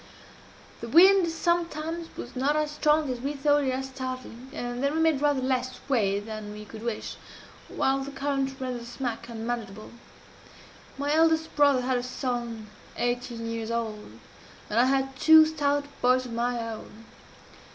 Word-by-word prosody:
The 230 - -6
wind 370 +4 +7
sometimes 335 -1 -1
was 240 - -8
not 275 +4 +1
as 305 -1 0
strong 300 -1 +2
as 250 - -4
we 280 +3 -2
thought 290 +1 +2
it - - +1
at 265 +1 -2
starting, 255 -1 -7
and 245 -1 -4
then 280 +2 +1
we - - +1
made 320 -4 +3
rather 290 -3 +2
less 255 -1 -1
way 205 -7 +2
than 215 0 -7
we 210 0 -9
could 215 +1 -10
wish, 235 -2 -4 0.5
while 270 +1 +1
the 270 +1 -5
current 275 -1 -2
rendered 255 -2 -4
the - - -9
smack 240 -1 -4
unmanageable. 225 -3 -5 1.1
My 285 +1 0
eldest 320 0 +2
brother 285 -3 +4
had 250 0 0
a - - -3
son 240 -3 -4 0.3
eighteen 240 -1 -2
years 230 -1 -4
old, 225 -2 -4 0.5
and 220 - +2
I 245 - +6
had 270 0 +1
two 315 +2 +8
stout 290 -2 0 0.2
boys 255 +1 +3
of 240 - -7
my 240 +1 -1
own. 225 0 -9
260 Hz, 165 wpm, -27 LUFS, 235-290 Hz, 1.1 s, two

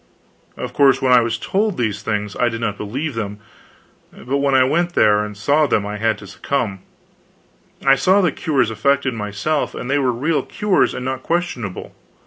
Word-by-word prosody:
Of - - -5
course, 135 -2 +4
when 130 -2 +1
I 125 - +7
was 115 0 -1
told 200 - -1
these 105 -4 -1
things 105 -1 -3
I 125 - +1
did 115 -1 -5
not 110 -3 -2
believe 130 +10 -4
them; 105 -3 -4 0.7
but 135 +3 -3
when 140 -1 +2
I 130 - +6
went 170 +6 0
there 105 -1 +4
and 105 -1 -7
saw 145 +7 +2
them 100 - +1
I 105 +1 -4
had 110 +1 0
to 100 - -12
succumb. 105 -2 -3 1.1
I 135 - +7
saw 185 +9 +3
the 180 -5 +2
cures 135 -6 0
effected 140 +3 +1
myself; 105 +8 -2
and 125 - -5
they 145 - +2
were 130 -2 +2
real 145 +7 0
cures 210 -2 0
and 125 - -5
not 130 0 -3
questionable. 165 - -3
125 Hz, 190 wpm, -19 LUFS, 105-145 Hz, 1.1 s, I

